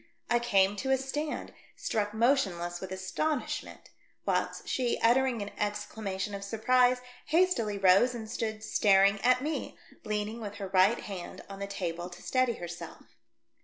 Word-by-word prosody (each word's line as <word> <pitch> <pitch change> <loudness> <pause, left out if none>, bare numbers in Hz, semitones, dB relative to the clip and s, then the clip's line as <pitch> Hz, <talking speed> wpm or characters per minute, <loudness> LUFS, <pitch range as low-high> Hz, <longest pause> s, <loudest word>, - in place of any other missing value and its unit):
I 240 - +4
came 200 -4 +3
to 265 +5 -3
a 265 - +4
stand, 295 +3 -4 0.2
struck 210 -2 -1
motionless 195 -8 +1
with 190 -1 -6
astonishment; 220 +10 -3 0.3
whilst - - -1
she, 250 -2 0
uttering 240 -1 +3
an 205 - -7
exclam 210 +1 -3
ation 195 +2 -3
of 200 0 -5
surprise, 250 +4 +3 0.3
hastily 310 - +2
rose 195 +6 +5
and 220 -2 -6
stood 220 -1 -3
star 195 -3 +4
ing 200 0 +2
at 255 +1 +3
me, 310 +2 -3 0.3
leaning 210 +2 -3
with 205 -2 -6
her 195 -2 -5
right 190 +4 +4
hand 185 -4 -7
on 195 0 -9
the 200 - -3
table 175 -3 -4
to 175 0 -12
steady 255 -2 +2
herself. 175 -3 -9
210 Hz, 160 wpm, -30 LUFS, 195-250 Hz, 0.3 s, rose